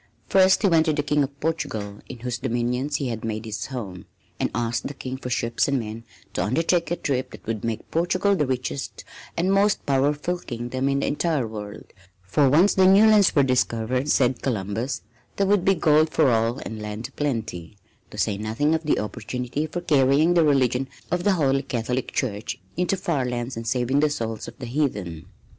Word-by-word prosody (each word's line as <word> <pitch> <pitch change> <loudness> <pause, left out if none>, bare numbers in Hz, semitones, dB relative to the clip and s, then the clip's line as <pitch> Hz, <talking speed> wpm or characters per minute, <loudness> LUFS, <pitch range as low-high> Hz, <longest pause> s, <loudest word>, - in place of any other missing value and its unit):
First 190 +1 +4
he - - +5
went 165 -3 +4
to 155 - +3
the 145 -1 0
King 150 0 +1
of 140 0 -3
Portugal 110 -10 -3
in 120 - -9
whose 120 0 -3
dominions 125 +3 -1
he 135 -3 -1
had 115 -2 -4
made 110 0 -3
his 105 -2 -4
home, 105 -9 -7 0.3
and - - +1
asked 120 0 -1
the 140 - -7
King 130 0 -5
for 125 - -6
ships 115 -1 0
and 140 -1 +1
men 115 0 -6 0.3
to - - -1
undertake 165 - +1
a 175 - 0
trip 130 -6 -2
that - - -13
would 110 -2 -3
make 115 -2 -4
Portugal 185 +4 +2
the 150 -7 0
richest 130 +2 -3 0.3
and 185 +3 +2
most 200 +1 +2
powerful 145 +5 +1
kingdom 125 0 -3
in 140 0 +1
the - - 0
entire 150 -4 0
world, 105 -1 -8 0.3
for 135 +9 +3
once 170 +9 +5
the 190 -1 +5
new 195 +3 +7
lands 210 -3 +5
were 140 - +5
discovered, 125 +1 0
said 130 -3 +2
Columbus, 110 +1 -2 0.3
there 200 - +1
would 200 -2 +3
be 195 +1 +4
gold 155 -2 +4
for 150 -5 +3
all 115 +2 +1
and 110 -5 -7
land 105 +2 -5
a - - -23
plenty, 110 - -3 0.3
to - - -11
say 100 -2 0
nothing 115 +9 0
of 160 - +1
the 155 - +1
opportunity 125 +6 -3
for 175 +3 -4
carrying 150 +1 +3
the 170 -2 +4
religion 135 -3 +2 0.2
of 180 0 0
the 205 - +3
Holy 135 -6 +2
Catholic 125 0 -2
Church 105 -5 -3 0.2
into 180 +3 0
far 165 -7 -1
lands 125 0 -3
and 115 0 -6
saving 125 +3 +1
the 150 +1 +3
souls 115 -6 -4
of - - -10
the 130 - -7
heathen. 105 - -2
130 Hz, 200 wpm, -24 LUFS, 115-155 Hz, 0.3 s, new